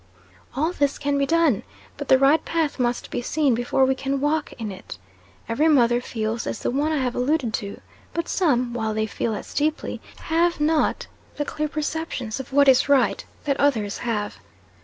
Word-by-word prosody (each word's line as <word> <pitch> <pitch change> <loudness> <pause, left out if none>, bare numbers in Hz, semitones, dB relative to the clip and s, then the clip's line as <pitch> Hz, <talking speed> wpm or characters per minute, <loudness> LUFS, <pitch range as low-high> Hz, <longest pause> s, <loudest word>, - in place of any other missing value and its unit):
All 310 +5 +1
this 285 -5 0
can 285 -1 0
be 275 - +1
done. 325 -8 +3 0.3
But 285 - -6
the 265 - +6
right 275 +4 +4
path 320 -4 -1
must 240 -1 -1
be - - -2
seen 285 +1 +1
before 245 +3 +2
we 265 - +2
can 270 +1 -2
walk 295 +2 0
in 220 -4 -5
it. 185 - -9 0.5
Every 260 +8 +2
mother 245 -5 +4
feels 225 -1 -3
as - - -4
the - - -1
one 290 +4 0
I 310 - +1
have 255 -3 -1
alluded 250 -2 0
to; 200 -3 -4 0.3
but 335 0 -3
some, 250 -9 +1
while 220 -2 -2
they 220 0 +1
feel 220 +1 -2
as - - -8
deeply, 305 +2 -1 0.2
have 335 +1 +1
not 305 +1 +1 0.3
the 290 - -2
clear 305 +1 -2
perceptions 300 -6 -3
of 265 - -7
what 280 +1 +4
is 265 +1 +5
right 280 -2 +3 0.2
that 280 -2 -1
others 220 -8 +1
have. 210 -3 -3
275 Hz, 190 wpm, -23 LUFS, 240-305 Hz, 0.5 s, the